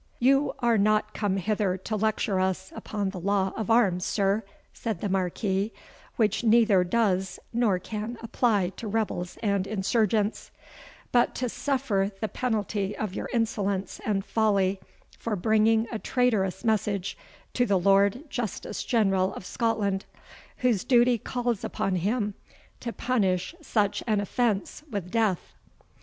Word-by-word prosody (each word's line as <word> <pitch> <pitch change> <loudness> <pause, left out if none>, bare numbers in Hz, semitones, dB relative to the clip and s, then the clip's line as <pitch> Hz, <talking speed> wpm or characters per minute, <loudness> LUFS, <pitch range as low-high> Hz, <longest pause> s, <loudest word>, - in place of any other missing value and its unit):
"You 275 +3 +3
are 235 -3 +2
not 215 +1 +2
come 200 -2 0
hither 200 -1 0
to 215 +4 -4
lecture 215 -2 0
us 190 0 -1
upon 205 -2 -3
the 190 - -6
law 195 +1 +1
of 220 -3 -3
arms, 200 -6 +3
sir," 200 +2 +1 0.3
said 220 -7 -3
the 205 - -2
Marquis, 190 +2 0 0.4
"which 215 0 +1
neither 220 -4 +5
does 190 -2 0
nor 230 -5 +2
can 215 +5 -5
apply 220 -5 +1
to 225 - -5
rebels 200 -4 -2
and 200 -2 +1
insurgents; 210 +1 0 0.6
but 240 -1 +3
to 250 - -1
suffer 245 -7 0
the 220 - -1
penalty 210 -3 -2
of 210 -4 -3
your - - -4
insolence 200 -5 -1
and 200 -2 0
folly 200 -3 +2 0.4
for 225 -2 -2
bringing 220 +3 +3
a 225 - -3
traitorous 215 -8 +1
message 210 -4 0 0.4
to 245 -1 +2
the 200 - +3
Lord 200 - +3
Justice 240 -7 -4
General 195 -5 +2
of - - -8
Scotland, 205 -3 0 0.5
whose 240 -6 +1
duty 240 -1 +4
calls 240 -1 -2
upon 190 -1 -1
him 210 +3 0 0.5
to 235 - -4
punish 205 - 0
such 210 -9 0
an 215 -2 +2
offence 205 +2 -1
with 200 -6 -4
death." 220 -6 0
210 Hz, 140 wpm, -27 LUFS, 195-230 Hz, 0.6 s, neither